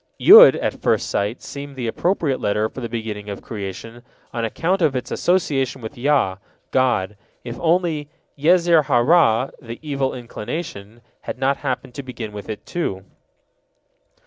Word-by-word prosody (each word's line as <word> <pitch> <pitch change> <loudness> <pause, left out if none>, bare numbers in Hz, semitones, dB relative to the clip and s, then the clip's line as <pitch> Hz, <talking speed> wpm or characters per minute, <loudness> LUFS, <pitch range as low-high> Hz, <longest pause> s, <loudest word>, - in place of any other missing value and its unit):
Yod - - +9
at - - -3
first - - +1
sight 105 +4 -2
seemed 140 0 -8
the 125 -2 -4
appropriate 150 - 0
letter 105 +1 +1
for 130 - -9
the 115 - -4
beginning 110 -3 -5
of 100 - -7
creation, 110 +2 -7 0.3
on 115 - -2
account 170 - -1
of 150 -5 +2
its 125 - -4
association 140 -8 0
with 110 -2 -8
Yah, 125 -8 +1 0.3
God, 120 -6 +1 0.3
if 120 -1 -7
only 165 -3 0 0.3
Yezer 170 +1 +4
ha 135 -3 +2
Ra' 130 -2 +3
the 115 -1 -8
evil 140 -3 -2
inclination, 120 -2 -7 0.2
had - - -6
not 135 +1 +1
happened 125 -3 -4
to 140 - -6
begin 120 -5 -7
with 105 0 -9
it, 110 - -6
too. 95 - -3
125 Hz, 155 wpm, -21 LUFS, 110-150 Hz, 0.3 s, Yod